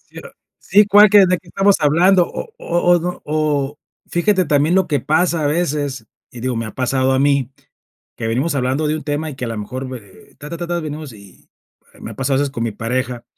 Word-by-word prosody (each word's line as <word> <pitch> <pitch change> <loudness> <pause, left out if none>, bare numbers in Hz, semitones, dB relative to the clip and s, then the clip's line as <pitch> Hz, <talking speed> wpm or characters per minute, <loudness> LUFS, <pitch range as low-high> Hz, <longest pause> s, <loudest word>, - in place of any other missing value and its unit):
Sí - - -15
era: - - -11 0.3
"Sí, 205 +1 +3
¿cuál? 205 +1 +7
Qué 205 -2 +7
¿de 180 0 +1
que 170 - -22
estamos 195 +3 +3
hablando?". 175 +5 +4
O 480 - -7
o 170 - -2 0.2
o - - +5
n 175 +1 -4
O 150 -2 -1 0.3
fíjate, 185 +2 +1
también, 150 +2 +2
lo 190 0 +3
que 145 -5 0
pasa 165 +3 +1
a - - +2
veces, 145 -6 -2 0.2
y 120 - -10
digo, 125 0 -2
me 115 0 -3
ha 110 - -8
pasado 130 +1 0
a 130 - +1
mí. 140 -2 +1 0.7
Que 115 - -4
venimos 130 +8 -1
hablando 135 +3 0
de 155 - 0
un 155 - -7
tema, 150 +2 -3
y 140 - -10
que 125 - -4
a - - -4
la 115 - -5
mejor, 130 +6 -6
me, 130 -1 -6
eh, 100 -4 -19
ta, 150 0 -9
ta, 170 - -5
ta, 175 - -4
ta. 175 0 -2
Venimos, 155 -3 -7
y 100 -4 -17 0.5
me - - -7
ha - - -11
pasado 135 0 -1
a - - +1
veces, 145 -1 -1
con 115 - -4
mi 115 - -2
pareja. 120 +2 -3
145 Hz, 245 wpm, -18 LUFS, 130-170 Hz, 0.7 s, cuál